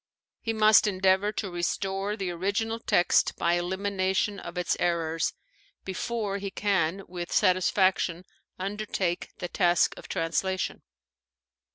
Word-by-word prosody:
He 225 - -2
must 215 -1 +5
endeavor 190 +1 +2
to 195 -4 -3
restore 195 +4 -2
the 190 -3 -2
original 200 +6 -1
text 175 -5 +2
by 170 - +2
elimination 190 +2 0
of 170 +1 -8
its 180 - 0
errors 165 -2 0 0.5
before 200 +1 -2
he 200 0 -4
can 195 -2 0
with 175 -1 -6
satisfaction 185 -2 +2 0.3
undertake 195 -2 -2
the 175 - -4
task 175 -1 +2
of - - -10
translation. 185 +3 -1
190 Hz, 120 wpm, -27 LUFS, 175-200 Hz, 0.5 s, must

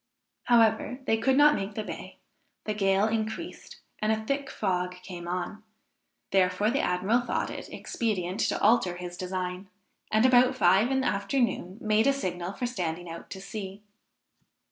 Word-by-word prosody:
However, 230 0 +3
they 225 - +2
could 260 +4 +2
not 295 +1 +7
make 200 -2 -3
the 215 - -2
bay; - - -8 0.5
the 215 - -2
gale 195 0 +2
increased, 220 0 -4 0.2
and 215 +1 +1
a 220 0 -1
thick 275 +2 -2
fog 180 -2 -1
came 175 -2 -8
on; 180 +4 -3 0.7
therefore 190 +3 +2
the 275 - +1
admiral 190 +7 +1
thought 245 - -2
it - - -8
expedient 195 -5 -2
to - - +1
alter 210 -5 +3
his 175 0 -6
design, 185 +1 -4 0.4
and 220 +3 +4
about 255 0 +5
five 195 +1 +4
in 265 0 +1
afternoon 200 -3 0
made 215 +3 +2
a 275 - +5
signal 180 -8 -3
for 245 - -3
standing 175 -7 -3
out 165 - -9
to 190 - -7
sea. 195 0 -7
210 Hz, 160 wpm, -28 LUFS, 180-230 Hz, 0.7 s, not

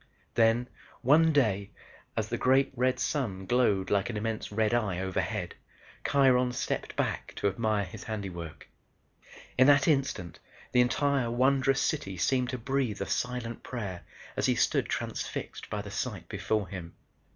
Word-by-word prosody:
Then 115 +2 +3 0.4
one 160 +5 +6
day, 105 -9 +2 0.5
as - - -1
the - - -1
great 135 +1 +3
red 125 +1 +1
sun 100 -10 -1
glowed 105 -5 +2
like 100 +1 +2
an 115 - -3
immense 110 0 -3
red 110 +1 +1
eye 105 -7 +1
overhead, 95 0 -2 0.5
Kiron 125 -3 +4
stepped 125 - -3
back - - -2
to - - 0
admire 105 0 0
his 100 +3 -10
handiwork. 90 -7 -6 0.9
In 130 - +7
that 145 -1 +6
instant 135 - 0 0.3
the 125 - +5
entire 130 0 +2
wondrous 135 +2 +3
city 95 -11 -1
seemed 125 +7 +1
to 130 - -2
breathe 130 -4 -1
a 100 - -1
silent 120 +1 -2
prayer 100 -8 -5 0.3
as - - +1
he - - +3
stood - - +2
transfixed - - -4
by 105 -1 -3
the 100 - -8
sight 100 -6 -4
before 105 +1 -1
him. 90 -4 -8
115 Hz, 150 wpm, -29 LUFS, 100-130 Hz, 0.9 s, In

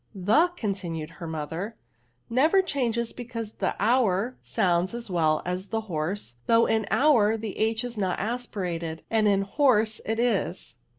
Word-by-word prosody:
" - - -33
The,^ 305 - +2
continued 170 -7 -3
her 165 - -4
jobther, 160 +7 -4 0.3
" 120 0 -42
never 310 +11 +3
changes, 235 -8 -1
because 230 -3 -6
the 190 - -2
hour 230 0 +2
sounds 180 +3 +1
as 235 -4 -6
well 155 -3 +2
a» 180 +1 0
the 220 +4 -4
horse^ 160 - -4
though 230 0 +5
in 220 -1 +1
hour 225 -7 +4
the 215 -3 -5
h 220 +1 +1
is 240 -3 -5
not 185 -3 0
as 245 +3 -2
pirated, 170 -4 -4
and 220 -1 +3
in 195 -1 +3
horse 220 -2 +2
it 220 +1 -2
is.' 205 - -1
210 Hz, 170 wpm, -26 LUFS, 180-235 Hz, 0.3 s, though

